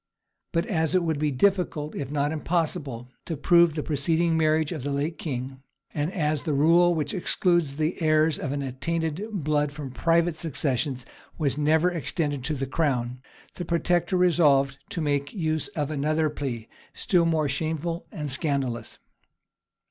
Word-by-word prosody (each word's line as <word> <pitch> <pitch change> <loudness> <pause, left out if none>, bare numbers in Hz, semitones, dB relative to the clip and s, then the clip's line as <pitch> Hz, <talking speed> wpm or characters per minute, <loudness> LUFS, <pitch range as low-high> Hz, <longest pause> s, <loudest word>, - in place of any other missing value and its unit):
But 165 0 0
as 165 -6 0
it 180 - +3
would 160 -3 -1
be 150 0 +1
difficult, 155 0 +1
if 140 - -4
not 145 0 0
impossible, 155 -6 -2
to 165 - -4
prove 170 +2 +4
the 150 - -2
preceding 160 +3 +1
marriage 155 0 +2
of 160 -5 -4
the 145 - -3
late 145 +4 -2
king, 130 -2 -5 0.3
and 150 +3 -1
as 155 -5 0
the 155 -4 -1
rule 170 +4 +5
which 150 -3 -2
excludes 175 -5 +1
the 155 +4 -1
heirs 155 0 +3
of 135 - -3
an 140 0 -2
attainted 160 - -2
blood 150 -6 0
from 140 -2 -7
private 165 +4 +2
successions 140 -4 -2 0.3
was 145 -5 +1
never 155 +4 +3
extended 145 -3 -2
to 155 - -1
the 135 -1 -2
crown, 130 -4 -1 0.3
the 180 - -5
protector 175 +1 +1
resolved 145 -6 +3
to 190 -7 -3
make 145 -2 -1
use 160 -4 0
of 150 0 -1
another 155 +1 +1
plea, 125 -7 -4 0.3
still 175 -3 +2
more 160 -2 +2
shameful 160 +4 -2
and 150 -8 -4
scandalous. 135 -5 -2
155 Hz, 160 wpm, -26 LUFS, 140-165 Hz, 0.3 s, rule